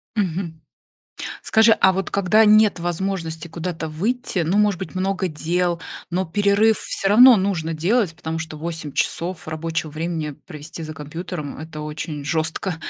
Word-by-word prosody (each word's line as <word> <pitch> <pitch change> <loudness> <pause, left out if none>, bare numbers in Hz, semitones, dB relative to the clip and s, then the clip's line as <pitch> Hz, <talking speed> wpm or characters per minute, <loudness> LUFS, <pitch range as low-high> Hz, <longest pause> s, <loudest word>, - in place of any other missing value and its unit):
Мгм. 175 -5 -2 0.8
Скажи, 225 +1 +5
а 190 - +4
вот 195 0 -3
когда 200 +3 +4
нет 215 -2 +5
возможности 170 -1 -3
куда-то 165 -1 -4
выйти, 205 +6 -1
ну, 170 +4 0
может 205 -3 +3
быть, 190 - -7
много 190 0 -1
дел, 170 +2 -1 0.3
но 180 +2 0
перерыв 205 +5 +3
всё 195 - -2
равно 245 +4 +8
нужно 180 -5 -1
делать, 180 +3 +1
потому 160 -1 -4
что 160 -1 -6
8 160 -2 -5
часов 170 +3 -2
рабочего 160 0 -3
времени 160 0 -3 0.2
провести 155 +2 -8
за 155 0 -7
компьютером- 155 0 -6
это 155 0 -8
очень 150 -1 -5
жёстко. 160 +4 -1
170 Hz, 150 wpm, -22 LUFS, 160-195 Hz, 0.8 s, равно